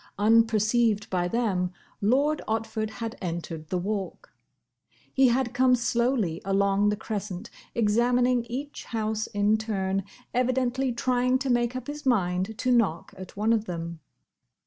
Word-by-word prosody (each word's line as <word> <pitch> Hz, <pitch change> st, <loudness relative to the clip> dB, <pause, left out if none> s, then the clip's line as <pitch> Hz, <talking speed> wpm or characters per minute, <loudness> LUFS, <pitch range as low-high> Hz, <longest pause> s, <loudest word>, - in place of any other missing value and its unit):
Unperceived 220 Hz, 0 st, +3 dB
by 175 Hz, -1 st, +1 dB
them, 185 Hz, -4 st, 0 dB, 0.3 s
Lord 280 Hz, +8 st, +2 dB
Otford 220 Hz, 0 st, -2 dB
had 230 Hz, -1 st, -5 dB
entered 165 Hz, -3 st, -5 dB
the 185 Hz, -, 0 dB
Walk. 195 Hz, +1 st, -4 dB, 0.8 s
He 265 Hz, -1 st, +5 dB
had 245 Hz, 0 st, +1 dB
come 255 Hz, 0 st, +4 dB
slowly 235 Hz, -7 st, 0 dB
along 200 Hz, +1 st, +2 dB
the 210 Hz, -, +1 dB
crescent, 205 Hz, -2 st, -5 dB, 0.2 s
examining 240 Hz, +2 st, +2 dB
each 270 Hz, +5 st, -6 dB
house 220 Hz, -1 st, -2 dB
in 210 Hz, 0 st, +2 dB
turn, 195 Hz, -3 st, -1 dB, 0.3 s
evidently 255 Hz, +1 st, +1 dB
trying 250 Hz, +1 st, +1 dB
to 265 Hz, 0 st, -1 dB
make 240 Hz, 0 st, +1 dB
up 255 Hz, -1 st, -4 dB
his 295 Hz, +1 st, -6 dB
mind 195 Hz, -4 st, +1 dB
to 255 Hz, -, 0 dB
knock 205 Hz, -10 st, +1 dB
at 185 Hz, 0 st, -10 dB
one 215 Hz, +2 st, +2 dB
of 220 Hz, -1 st, 0 dB
them. 170 Hz, -2 st, -5 dB
220 Hz, 140 wpm, -27 LUFS, 195-245 Hz, 0.8 s, He